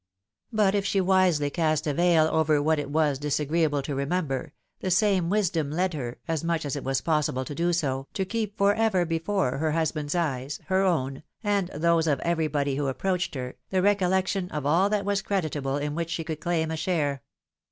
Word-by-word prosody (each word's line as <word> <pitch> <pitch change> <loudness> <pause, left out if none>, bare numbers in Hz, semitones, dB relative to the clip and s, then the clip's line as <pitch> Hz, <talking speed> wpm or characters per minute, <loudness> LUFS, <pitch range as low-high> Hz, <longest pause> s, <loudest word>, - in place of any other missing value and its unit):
But 210 -3 +3
if 200 -1 +1
she 195 0 +1
wisely 185 -6 +3
cast 155 -1 0
a 150 - 0
veil 170 0 +4
over 155 -1 +2
what 155 +1 +2
it 145 - -4
was 145 -2 +1
disagreeable 150 0 0
to 140 - -4
remember, 140 +1 -2 0.3
the 185 - -2
same 190 -2 +2
wisdom 175 -7 +1
led 180 +4 0
her, 125 -5 -5
as 165 -2 -1
much 165 -2 -1
as 145 - -2
it 145 - -5
was 135 0 0
pos 155 -2 +1
sible 130 -2 -3
to 145 - -6
do 170 +4 0
so, 135 -5 -1
to 190 - 0
keep 215 0 -3
for 200 0 +4
ever 210 -5 +2
before 165 -4 -1
her 155 0 0
husband's 155 -1 -1
eyes, 145 -4 -2
her 190 0 +2
own, 140 -8 0 0.2
and 200 -3 +1
those 165 0 +1
of 145 -4 +2
everybody 155 -5 0
who 145 -1 -1
approached 180 +5 -1
her, 125 -1 -5
the 190 - -1
recoUec 190 -2 +3
tion 190 -2 -2
of 150 -4 -4
all 170 +7 +3
that 205 -2 0
was 200 0 +1
creditable 150 -8 -1
in 145 0 -2
which 165 +1 -3
she 165 -1 -2
could 160 -1 -5
claim 160 0 -1
a 160 - -2
share. 150 -7 -1
160 Hz, 205 wpm, -26 LUFS, 145-185 Hz, 0.3 s, veil